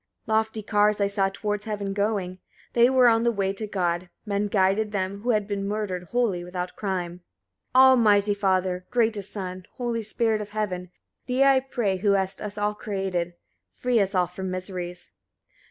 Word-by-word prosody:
74. 220 -3 0
Lofty 220 0 0
cars 210 0 +2
I 200 - +3
saw 200 -1 +1
towards 210 +1 -3
heaven 205 -2 -3
going; 200 -3 -1 0.3
they 240 +1 +5
were 260 -2 +5
on 225 -1 +4
the 235 0 +2
way 195 -3 -1
to 215 +2 -4
God: 175 -3 -1 0.2
men 205 0 0
guided 200 +1 +2
them 200 0 -2
who 245 - -3
had 210 -4 +2
been 200 -1 -2
murdered 200 -4 -3
wholly 215 -4 0
without 180 0 -5
crime. 180 -3 -3 0.5
75. 255 - +6
Almighty 215 -6 +6
Father! 185 -2 0
greatest 220 -4 0
Son! 185 -2 -5
holy 235 -2 -2
Spirit 220 0 0
of 205 - -7
heaven! 190 -4 -3 0.4
Thee 255 +1 +3
I 275 -1 +6
pray, 235 -7 -1
who 200 +1 +2
hast 190 0 -1
us 210 0 -6
all 210 0 0
created; 190 -4 -3 0.4
free 250 -2 +1
us 195 -1 0
all 180 -1 +4
from 185 +2 -6
miseries. 180 -1 -5
200 Hz, 180 wpm, -25 LUFS, 185-220 Hz, 0.5 s, 75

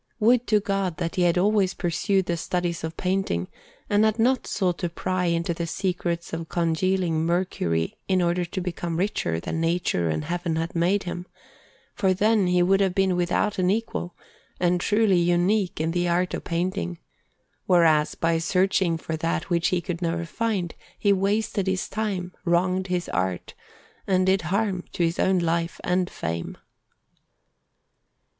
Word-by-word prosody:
Would 240 +2 +3
to 215 - +4
God 195 -4 -1
that 170 -2 -2
he 185 - 0
had 175 0 +3
always 195 0 +2
pursued 190 +2 0
the 170 - -1
studies 175 0 -2
of 160 0 -5
painting, 185 - -1 0.4
and 205 +1 +3
had 220 0 +2
not 250 +3 +2
sought 180 -4 0
to 175 - -1
pry 185 +2 -2
into 170 0 0
the 170 0 -4
secrets 175 -2 -2
of 165 0 -4
congealing 170 0 +1
mercury 165 - -1
in 185 -1 +2
order 175 0 +1
to 180 +2 -4
become 175 -2 -3
richer 170 - -1
than 160 - -3
Nature 165 - 0
and 80 -1 -2
Heaven 175 -1 -2
had 165 +1 -2
made 180 +4 +2
him; 175 0 -5 0.7
for 190 -4 +1
then 210 0 +3
he 180 0 +3
would 195 +2 +3
have 190 -2 +1
been 190 -2 +2
without 180 +3 0
an 180 0 +2
equal, 195 -4 -2 0.4
and 175 0 +2
truly 210 -3 +3
unique 175 +3 +1
in 160 +1 0
the 175 +1 0
art 180 +1 +1
of - - -4
painting, 170 - -2 0.7
whereas, 160 -4 +4
by 165 0 +1
searching 180 0 +1
for 160 0 -4
that 165 +3 -2
which 170 -1 +2
he 180 -1 +1
could 175 0 -5
never 170 0 -1
find, 195 -2 -2 0.2
he 200 -1 +3
wasted 200 0 0
his 190 -1 0
time, 195 -4 -3
wronged 185 +2 +1
his 180 -1 -1
art, 90 -1 -2 0.5
and 185 -1 +3
did 190 0 +3
harm 190 +1 -1
to 175 - 0
his 165 0 0
own 190 0 +3
life 170 0 -1
and 180 0 +1
fame. 85 +1 -4
180 Hz, 165 wpm, -25 LUFS, 170-190 Hz, 0.7 s, to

